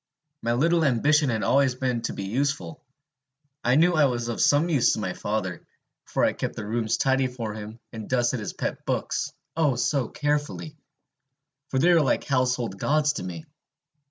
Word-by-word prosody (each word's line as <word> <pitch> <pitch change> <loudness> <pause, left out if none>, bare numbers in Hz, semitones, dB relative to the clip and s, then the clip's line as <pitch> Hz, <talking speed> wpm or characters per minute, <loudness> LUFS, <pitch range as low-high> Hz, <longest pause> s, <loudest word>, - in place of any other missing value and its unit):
My 115 - 0
little 165 +6 +2
ambition 145 +2 +3
had 110 -3 -1
always 135 -2 +3
been 125 -2 -1
to - - -3
be 100 - -5
useful. 140 +8 -2 0.8
I 125 +2 +3
knew 170 +4 +4
I 155 -3 +4
was 120 -3 -1
of 115 - -2
some 145 +4 +4
use 145 -8 +3
to - - -2
my 95 -4 -2
father; 95 -5 -3 0.4
for - - +1
I - - +2
kept - - -4
the 110 - -5
rooms 110 +1 0
tidy 135 0 +2
for 120 -4 -5
him, 110 +1 -8 0.2
and 110 -2 -7
dusted 125 -1 +1
his 105 - -5
pet - - -4
books - - -2 0.2
oh, 155 -5 +2
so 125 +1 0
carefully! 150 +1 -2 0.9
for 135 - -1
they 175 +6 +5
were 165 - +5
like 135 - +1
household 125 -6 0
gods 150 +3 +2
to - - -5
me. 85 -3 -7
130 Hz, 185 wpm, -25 LUFS, 115-145 Hz, 0.9 s, they